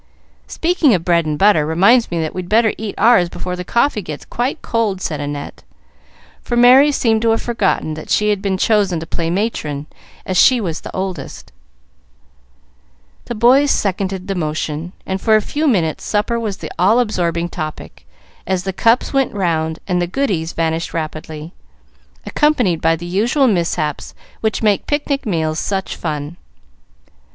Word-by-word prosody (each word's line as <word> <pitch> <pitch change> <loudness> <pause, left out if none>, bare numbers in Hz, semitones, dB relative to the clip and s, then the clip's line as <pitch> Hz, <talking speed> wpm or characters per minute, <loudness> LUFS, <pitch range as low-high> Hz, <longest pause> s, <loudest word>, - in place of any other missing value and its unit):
"Speaking 325 - +2
of 165 - -3
bread 170 -2 +2
and 150 -1 -1
butter 195 -5 +4
reminds 195 +10 +3
me 170 - -2
that 155 - -3
we'd 180 -1 -6
better 220 0 +3
eat 215 -2 -6
ours 230 -7 +4
before 180 +1 -5
the 180 - -5
coffee 235 +3 +1
gets 155 -5 -8
quite 255 +6 -3
cold," 220 -5 -1
said 155 -5 -3
Annette, 145 0 -6 0.8
for 240 - -2
Merry 255 +4 +7
seemed 225 -5 +1
to 230 - +2
have 225 - +1
forgotten 205 -9 0
that 155 - -9
she 210 0 +2
had 205 -2 -1
been 195 -2 -1
chosen 200 -4 +2
to 160 - -6
play 165 0 -3
matron, 165 -7 -2 0.4
as 185 - -1
she 255 -2 +6
was 170 -7 -3
the - - -8
oldest. 185 -7 -5 1.7
The 240 - -5
boys 255 +6 +4
seconded 190 -3 -1
the 195 - -1
motion, 155 0 -3
and 190 0 -3
for 220 -1 +4
a - - +5
few 295 +9 -2
minutes 170 - 0
supper 220 +3 0
was 210 -4 -3
the - - -8
all 205 +7 +4
absorbing 175 -7 -1
topic, 155 - -7 0.4
as 185 -1 0
the 190 0 -3
cups 230 +8 +2
went 270 -5 +1
round 160 -4 -1
and 180 -2 0
the 175 - 0
goodies 180 -8 -1
vanished 165 0 -2
rapidly, 155 +1 -6 0.7
accompanied 245 - +1
by 165 0 +3
the 170 +2 -8
usual 225 - +1
mishaps 170 - -1 0.2
which 220 0 -1
make 210 -2 +1
picnic 285 -3 -1
meals 160 -4 -1
such 195 -1 -3
fun. 150 +2 -5
190 Hz, 165 wpm, -18 LUFS, 165-225 Hz, 1.7 s, Merry